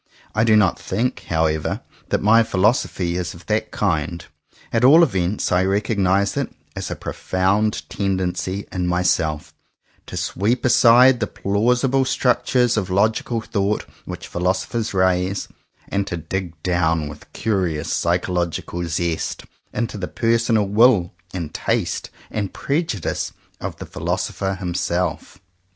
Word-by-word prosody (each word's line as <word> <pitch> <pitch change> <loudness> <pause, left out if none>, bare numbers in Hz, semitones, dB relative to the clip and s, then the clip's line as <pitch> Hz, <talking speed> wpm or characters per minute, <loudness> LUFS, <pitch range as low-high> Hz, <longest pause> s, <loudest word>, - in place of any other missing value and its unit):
I 110 - +2
do 110 -2 +5
not 100 -4 +3
think, 120 +7 -2
how 80 -1 +2
ever, 80 -1 -1 0.3
that - - 0
my 110 +2 +6
philosophy 95 -4 +1
is 90 -1 -3
of 85 - -14
that 110 0 0
kind. 85 -4 -1 0.5
At 115 +1 +2
all 155 +7 +8
events 95 - 0
I 90 +1 +3
recognize 100 0 +1
it - - -2 0.2
as - - -4
a - - -3
profound 95 -3 0
tendency 95 0 -2
in 90 -1 -2
myself, 85 -4 0 0.5
to - - -6
sweep 115 +8 0
aside 125 +1 +6
the 105 - 0
plausible 125 +6 +1
structures 125 -2 +2
of 95 -3 -1
logical 110 +4 +1
thought 105 -1 -1 0.2
which - - -7
philosophers 95 +6 -1
raise, 95 +1 +1 0.4
and 100 0 -1
to 85 - -3
dig 85 0 -5
down 85 -4 +1
with 75 0 -11
curious 95 -8 -1
psychological 85 0 -1
zest 85 0 -2 0.3
into 110 -2 -3
the 90 - -3
personal 115 -2 +2
will 105 -3 +4 0.2
and 85 -5 -5
taste - - -1 0.2
and 100 -4 -3
prejudice 140 - -2 0.3
of - - -5
the - - -7
philo - - -2
sopher 95 0 -2
himself. 90 0 -2
95 Hz, 135 wpm, -21 LUFS, 90-110 Hz, 0.5 s, all